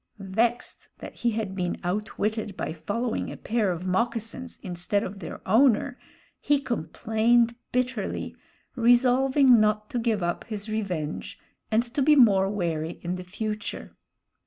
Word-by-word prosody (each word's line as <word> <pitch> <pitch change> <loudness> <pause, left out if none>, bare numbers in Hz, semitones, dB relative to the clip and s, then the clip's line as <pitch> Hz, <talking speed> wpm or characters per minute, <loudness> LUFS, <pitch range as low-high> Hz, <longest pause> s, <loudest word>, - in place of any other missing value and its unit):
Vexed 235 +3 0
that - - -10
he 240 - +1
had 215 -3 -3
been 180 -2 -2
outwitted 210 +2 -2
by - - -3
following 225 +8 -3
a - - -8
pair 220 -3 0
of 175 +1 -5
moccasins 230 +5 -2
instead 180 +2 -1
of 195 +1 -6
their 170 - -8
owner, 225 +3 +3 0.4
he 290 -1 +2
complained 235 - +1 0.2
bitterly, 250 -3 -2 0.4
resolving 250 +1 +5
not 215 0 +1
to 245 - -1
give 225 -5 0
up 175 0 -1
his 210 -1 -6
revenge 185 -8 -3 0.3
and 220 +1 +3
to 245 +4 -3
be 300 +2 +6
more 200 -8 +5
wary 170 -5 -2
in 175 +1 -2
the 185 - -6
future. 210 +3 -5
220 Hz, 140 wpm, -26 LUFS, 190-240 Hz, 0.4 s, be